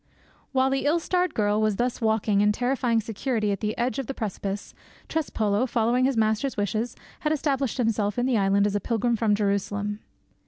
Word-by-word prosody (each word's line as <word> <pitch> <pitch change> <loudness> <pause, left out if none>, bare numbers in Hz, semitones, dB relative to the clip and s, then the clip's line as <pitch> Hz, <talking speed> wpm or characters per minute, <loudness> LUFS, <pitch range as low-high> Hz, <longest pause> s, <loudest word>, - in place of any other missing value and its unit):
While 265 0 +2
the 270 +1 0
ill 315 +4 +3
starred 360 +2 0
girl 210 0 +2
was 215 -2 +2
thus 245 +3 -1
walking 220 -2 +2
in 210 0 +4
terrifying 245 0 +1
security 220 0 -1
at 200 - -2
the 215 0 -2
edge 250 +3 -1
of 265 - -4
the 270 - -4
precipice, 200 -2 -4 0.3
Trespolo, 225 -7 0
following 240 +2 +2
his 265 -2 +1
master's 220 +4 +1
wishes, 215 +3 -1 0.2
had 305 - 0
established 275 -5 0
himself 220 -3 0
in 245 - +1
the 260 -2 +2
island 200 -1 +3
as 205 - 0
a - - +2
pilgrim 235 +2 0
from 215 -2 +2
Jerusalem. 205 0 -1
225 Hz, 190 wpm, -26 LUFS, 205-255 Hz, 0.3 s, in